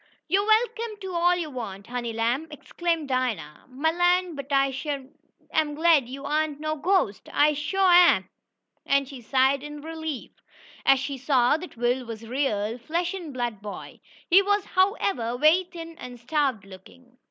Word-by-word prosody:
"Yo' 380 +5 +3
am 410 - -4
welcome 450 -1 +1
to 380 -3 -6
all 350 +1 +3
yo' 340 -3 -3
want, 200 -6 -6
honey 240 -1 -4
lamb!" 235 +7 -1
exclaimed 330 +1 -3
Dinah. 235 - -2
"Mah 285 +5 0
land, 355 0 +2
but 280 0 -8
I 275 -1 +3
shuah 275 0 -4 0.5
am 305 -2 +1
glad 310 -5 +4
yo' 275 +2 -7
ain't 300 0 -1
no 310 0 -2
ghostest! 310 - 0
I 300 +1 +4
shuah 355 +3 +5
am!" - - -7 0.6
and 275 -1 +1
she 265 -2 -10
sighed 265 +3 +2
in 295 0 -8
relief, 315 -3 -6 0.6
as 270 - +6
she 270 0 -4
saw 260 -1 +3
that 350 -6 -10
Will 245 +2 0
was 230 -2 -8
a 225 - -11
real, 235 -4 -1
flesh 340 +8 -2
and 350 -6 -6
blood 240 -5 -3
boy. 205 -1 -8 0.3
He 375 +3 +7
was, 405 0 +1
however, 370 - 0
very 315 +7 +4
thin 330 -2 -10
and 245 -1 -9
starved 260 -5 -1
looking. 245 +7 -16
285 Hz, 175 wpm, -25 LUFS, 245-340 Hz, 0.6 s, He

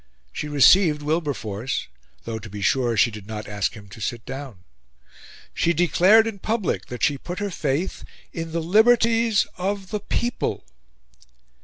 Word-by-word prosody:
She 150 - -4
received 150 +2 +5
Wilberforce 135 -8 -2 0.4
though, 115 -1 -5
to 110 0 -10
be 100 0 -6
sure, 120 +1 +1
she 120 - +4
did 105 -2 -10
not 110 -1 -6
ask 105 0 -2
him 105 -2 -12
to 110 - -12
sit 115 +3 -4
down. 135 -8 -8 0.9
She 170 - +1
declared 180 +6 +5
in 220 -3 -5
public 215 -1 -2
that 125 - -7
she 140 -2 +2
put 180 +1 -6
her 205 -1 -3
faith 155 +3 -2 0.3
in 165 -1 -5
"the 165 0 -2
liberties 225 +3 +4
of 195 +1 -2
the 210 - -1
People." 240 +4 -2
155 Hz, 155 wpm, -23 LUFS, -, 0.9 s, received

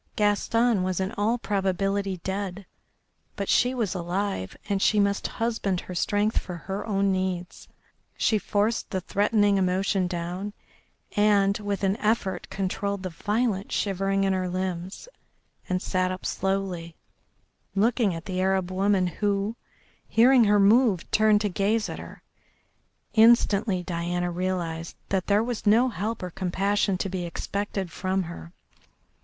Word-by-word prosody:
Gaston 215 +1 +2
was 185 0 -1
in 190 +1 -1
all 220 +4 0
probability 195 -2 -1
dead, 195 0 -4 0.7
but 200 -1 -3
she 250 +1 +3
was 225 -7 -1
alive, 180 - -3
and 200 -1 0
she 210 - +3
must 200 0 +1
husband 220 -5 -1
her 185 - -8
strength 205 +4 +1
for 180 - -7
her 190 +4 -5
own 200 -2 +1
needs. 185 -2 -3 0.5
She 215 - +2
forced 210 +3 0
the 190 - -1
threatening 205 +1 +2
emotion 185 0 +1
down, 180 +3 -4 0.6
and, 205 -1 +4
with 205 -1 -3
an 195 +2 +2
effort, 215 -3 -1
controlled 200 +1 -2
the 185 - -4
violent 210 +2 -1
shivering 195 0 0
in 195 -1 +2
her 185 -1 -1
limbs, 185 - -4 0.6
and 185 0 -1
sat 185 -1 0
up 185 - -6
slowly, 190 -4 -2 0.8
looking 220 -2 +2
at 165 - -8
the 185 -2 -2
Arab 190 -1 +1
woman, 195 0 +2
who, 200 +3 -1 0.5
hearing 245 +1 +5
her 205 0 +4
move, 210 -2 +4
turned 215 -1 +4
to 210 - +1
gaze 210 +4 0
at - - -6
her. - - -11 0.9
Instantly 220 -4 +4
Diana 175 +1 -2
realised 170 -2 -3
that 190 -2 -1
there 205 +1 +3
was 235 -2 -4
no 235 +5 +5
help 220 -1 -3
or 180 - -4
compassion 195 +2 0
to 195 - -2
be 185 -1 -3
expected 195 +2 -3
from 190 +2 -1
her. 170 0 -9
195 Hz, 145 wpm, -26 LUFS, 185-210 Hz, 0.9 s, hearing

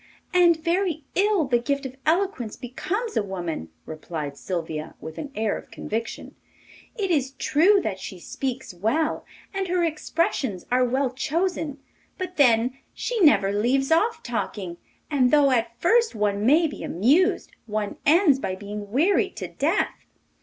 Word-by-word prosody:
'And 345 -2 +5
very 335 -1 0
ill 395 -3 +2
the 245 -2 +2
gift 280 +3 -2
of 260 0 -6
eloquence 320 - 0
becomes 405 - -4
a - - +3
woman,' 175 - -4 0.2
replied 155 -2 -5
Sylvia, 160 -2 -4
with 160 0 -8
an 285 - -6
air 220 -1 0
of - - -16
conviction. 225 +2 -5 0.6
'It 390 -4 -1
is 275 -4 +1
true 360 +9 +4
that 190 -3 -3
she 185 - -8
speaks 260 +4 -4
well, 225 - -1 0.3
and 390 -1 -2
her 355 0 +1
expressions 310 - -1
are 255 +1 +4
well 260 +1 +1
chosen; 310 +1 -1 0.4
but 365 -1 -5
then 250 -1 +3 0.2
she 485 -2 -2
never 295 - +5
leaves 255 +7 +1
off 430 +8 +2
talking, 200 -7 -4 0.3
and 260 -4 +3
though 285 -1 +5
at 235 -1 0
first 460 - +3
one 210 0 0
may 315 +5 +5
be 305 - -4
amused, 285 - +2 0.2
one 210 -1 -3
ends 310 -3 +5
by 185 - -3
being 205 +1 -7
wearied 330 - +2
to - - -5
death. - - -1
265 Hz, 155 wpm, -25 LUFS, 210-335 Hz, 0.6 s, And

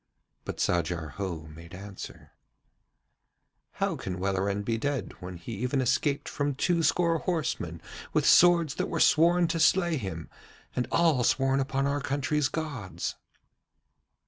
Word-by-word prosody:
But - - -5
Sajar 85 -2 0
Ho 95 -5 -3
made 80 +3 -12
answer: 100 0 -10 1.4
'How - - -1
can 95 -1 -5
Welleran 100 +1 -1
be 115 +2 -1
dead 140 -7 -2
when 90 0 -7
he 85 +7 -9
even 125 +5 -1
escaped 135 +3 +1
from 145 -1 -2
two 170 +4 +1
score 165 0 +2
horsemen 150 - -2 0.3
with - - +1
swords 170 -4 +6
that - - -2
were - - -2
sworn 170 +2 +5
to 165 0 -1
slay 170 0 +3
him, 90 - -5 0.5
and 125 -1 -1
all 160 -7 +3
sworn 135 +2 +2
upon 135 0 0
our 140 +1 0
country's 145 +1 0
gods?' 145 - -4
135 Hz, 140 wpm, -28 LUFS, 95-155 Hz, 1.4 s, swords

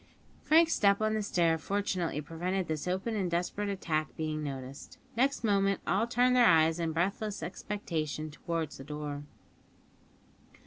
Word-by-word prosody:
Frank's 325 +2 +5
step 200 -1 +4
on 215 0 +1
the 215 - 0
stair 170 -5 +2
fortunately 185 -4 -1
prevented 175 +4 -2
this 155 +1 -3
open 190 +5 -1
and 190 -4 0
desperate 180 +4 -1
attack 160 -6 -1
being 155 -1 -2
noticed. 135 -1 -7 0.2
Next 265 +2 +1
moment 195 -2 +2
all 210 +5 +1
turned 245 +1 +3
their 245 -2 +6
eyes 160 0 +4
in 165 -1 0
breathless 195 +3 -1
expectation 160 -4 -4
towards 165 -1 -4
the - - -7
door. 145 0 -5
180 Hz, 145 wpm, -31 LUFS, 155-205 Hz, 0.2 s, their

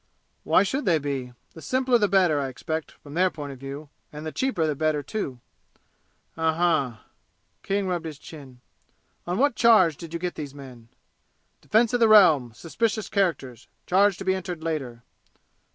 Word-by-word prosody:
"Why - - +4
should 265 +9 -2
they 170 -4 +3
be? 135 -4 -4 0.2
The 160 - -12
simpler 255 +1 +1
the 205 - +3
better, 180 -7 +3
I 140 - -2
expect, 160 +5 -5
from 145 - -14
their 185 +3 +3
point 145 -4 -7
of 135 - -11
view; 140 +2 -8 0.2
and 150 +1 -8
the 155 - -4
cheaper 175 - -1
the 155 - 0
better, 150 0 -1
too!" 140 - -5 1.0
"Um 160 -1 0
m 160 -7 +1
m!" - - -19 0.6
King 200 0 -1
rubbed 175 -3 -2
his 155 -3 -8
chin. 135 -5 -13 0.7
"On 175 +1 -1
what 285 +3 +3
charge 200 - +5
did 165 -2 -10
you 170 - -4
get 180 0 -3
these 145 -2 -7
men?" 125 -5 -12 0.7
"Defense 225 +2 +2
of 245 - +2
the 230 - +5
Realm 165 - +6
suspicious 215 - -2
characters 140 - -1 0.2
charge 195 +1 +3
to 195 - -8
be 190 - +2
entered 180 -3 -5
later." 135 -8 -4
160 Hz, 180 wpm, -25 LUFS, 140-195 Hz, 1.0 s, Realm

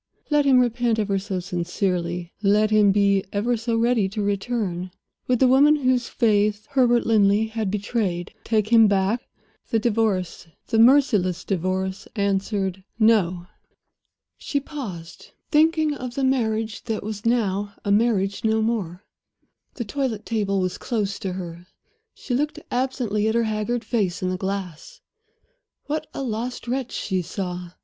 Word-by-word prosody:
Let 295 -1 +3
him 270 -2 +5
repent 240 -1 +1
ever 200 -2 0
so 190 -1 -3
sincerely, 175 -1 -2
let 210 +1 +3
him 210 -2 +5
be 200 -1 +3
ever 225 +4 0
so 230 0 -1
ready 230 -4 +2
to 210 +1 -3
return, 200 -3 -2 0.4
would 250 - +2
the 260 - +4
woman 280 +4 +6
whose 255 -4 +1
faith 210 -2 +1
Herbert 245 -3 +3
Linley 210 -1 +3
had 220 -2 -2
betrayed 200 -3 -2
take 215 -2 0
him 225 -2 +7
back? 200 +4 +1 0.5
The 225 - +2
Divorce, 210 -7 0 0.2
the 225 - 0
merciless 225 - +4
Divorce, 190 +1 -2
answered: 195 -2 -1
No! 195 -6 +3 0.9
She 285 - -1
paused, 215 - -8 0.2
thinking 315 0 +3
of 250 -3 -6
the 275 - -1
marriage 225 -5 0
that 225 -2 -3
was 210 0 -5
now 205 -4 0
a 200 - +1
marriage 205 -2 +1
no 220 0 +2
more. 200 -5 -2 0.7
The 240 - -4
toilet 230 -2 -3
table 205 -4 0
was 185 -1 -2
close 205 -5 -2
to 190 -2 -3
her; 175 -1 -7 0.5
she 255 - -5
looked 295 +4 0
absently 245 -5 0
at 220 - 0
her 235 - +3
haggard 220 +2 -2
face 205 -6 -1
in 185 - 0
the - - -1
glass. 190 - -5 0.9
What 305 +1 -3
a 275 - -5
lost 240 +1 -4
wretch 255 0 -2
she 190 -2 -2
saw! 180 0 -5
215 Hz, 150 wpm, -23 LUFS, 190-240 Hz, 0.9 s, him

